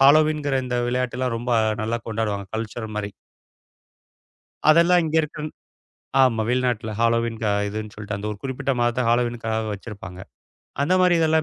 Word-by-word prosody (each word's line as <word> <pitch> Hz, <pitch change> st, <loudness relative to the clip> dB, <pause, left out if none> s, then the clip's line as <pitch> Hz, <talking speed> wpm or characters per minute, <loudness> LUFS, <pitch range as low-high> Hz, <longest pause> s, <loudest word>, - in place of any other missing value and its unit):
ஹாலோவின்ங்கற 150 Hz, 0 st, +5 dB
இந்த 125 Hz, -1 st, -1 dB
விளையாட்டு 125 Hz, 0 st, -1 dB
எல்லாம் 125 Hz, -2 st, 0 dB
ரொம்ப 120 Hz, +1 st, -2 dB, 0.3 s
நல்லா 115 Hz, +2 st, 0 dB
கொண்டாடுவாங்க. 105 Hz, -3 st, -2 dB
கல்ட்சர் 110 Hz, 0 st, -5 dB
மாரி. 105 Hz, -1 st, -2 dB, 1.6 s
அதெல்லாம் 170 Hz, +3 st, +6 dB
இங்க 155 Hz, -, -2 dB
இருக்கன் 150 Hz, 0 st, -5 dB, 0.7 s
ஆமா. 120 Hz, -4 st, +3 dB
வெளிநாட்டுல 125 Hz, -3 st, 0 dB
ஹாலோவீன் 115 Hz, 0 st, +1 dB
க -, -, +1 dB, 0.2 s
இதுன்னு 105 Hz, +1 st, -5 dB
சொல்ட்டு, 105 Hz, 0 st, -5 dB
அந்த 100 Hz, -, -6 dB
ஒரு 105 Hz, -, -6 dB
குறிப்பிட்ட 135 Hz, +1 st, -2 dB
மாதத்தை 120 Hz, +1 st, +1 dB
ஹாலோவீனுக்காக 120 Hz, -2 st, 0 dB
வச்சிருப்பாங்க. 100 Hz, -3 st, -9 dB, 0.6 s
அந்த 150 Hz, +6 st, +1 dB
மாதிரி 180 Hz, -1 st, +5 dB
இதெல்லாம் 160 Hz, 0 st, +3 dB
120 Hz, 140 wpm, -23 LUFS, 110-140 Hz, 1.6 s, அதெல்லாம்